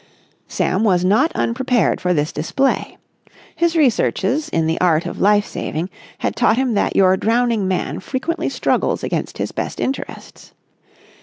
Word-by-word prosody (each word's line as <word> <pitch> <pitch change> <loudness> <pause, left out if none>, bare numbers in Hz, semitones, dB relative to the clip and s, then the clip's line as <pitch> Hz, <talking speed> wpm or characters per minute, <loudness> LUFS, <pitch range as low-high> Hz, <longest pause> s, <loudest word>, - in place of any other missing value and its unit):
Sam 190 +4 0
was 180 -4 +2
not 240 - +3
unprepared 245 -3 +1
for 180 - 0
this 150 -3 0
display. 270 - -1 0.6
His 340 0 +1
researches 270 - +1
in 165 -1 0
the 160 +1 -1
art 170 -3 +3
of - - -5
life 205 +1 +4
saving 165 +5 -4 0.3
had - - -2
taught 220 - +3
him 260 -2 +1
that 200 - 0
your 190 -1 +5
drowning 230 -1 +1
man 185 -1 -2
frequently 285 - -3
struggles - - 0
against - - -3
his - - -3
best - - -4
interests. 270 - -5
210 Hz, 150 wpm, -19 LUFS, 180-260 Hz, 0.6 s, your